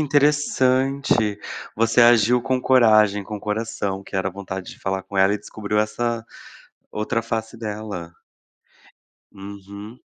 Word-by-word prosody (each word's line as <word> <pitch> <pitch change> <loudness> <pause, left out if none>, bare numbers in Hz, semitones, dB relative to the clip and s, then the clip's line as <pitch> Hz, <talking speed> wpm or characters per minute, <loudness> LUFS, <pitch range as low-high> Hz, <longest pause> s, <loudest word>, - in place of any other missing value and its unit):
interessante. 135 -6 +2 0.4
Você 115 +2 +3
agiu 120 0 +5
com 130 -1 0
coragem, 110 -6 +4
com 105 0 -6
coração, 105 -2 -3
que 100 - -13
era 95 0 0
vontade 95 -1 -7
de - - -13
falar 95 0 -2
com 95 +2 -9
ela 95 +1 +4
e - - -3
descobriu 105 0 -3
essa 115 +2 -1 0.7
outra 110 +2 -1
face 115 0 -4
dela. 105 -6 -6 1.2
Uhum. 100 +3 -10
110 Hz, 125 wpm, -22 LUFS, 100-120 Hz, 1.2 s, agiu